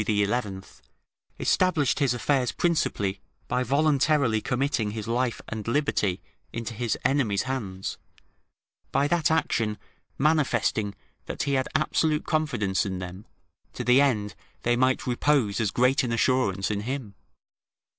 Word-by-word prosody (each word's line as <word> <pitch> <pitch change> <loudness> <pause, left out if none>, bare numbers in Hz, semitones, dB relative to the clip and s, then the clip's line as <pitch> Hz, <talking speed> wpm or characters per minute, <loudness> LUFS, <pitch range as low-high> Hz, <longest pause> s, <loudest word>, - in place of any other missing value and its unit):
] - - 0 1.4
established 170 -8 +2
his 140 -4 +2
affairs 125 0 +1
principally 105 - 0 0.3
by 125 - 0
voluntarily 140 -3 +2
committing 125 -4 0
his 110 - -5
life 120 +1 0
and 110 -1 -6
liberty 115 -8 0 0.3
into 115 0 -5
his 115 0 -1
enemies' 125 -8 +2
hands, 105 -8 -4 0.9
by 140 - +2
that 165 0 +2
action 115 -9 0 0.4
manifesting 125 -9 +1 0.3
that - - -3
he 140 - -1
had 130 -1 0
absolute 155 0 +1
confidence 120 - 0
in 95 -2 -3
them, 90 +2 -8 0.5
to - - -4
the 125 +3 +5
end 105 -7 +1 0.3
they 120 0 +2
might 130 +1 +2
repose 125 -4 +1
as 110 - +1
great 125 +5 +3
an 120 - -2
assurance 115 -5 +1
in 105 - -1
him. 125 -2 -4
125 Hz, 130 wpm, -26 LUFS, 105-140 Hz, 1.4 s, the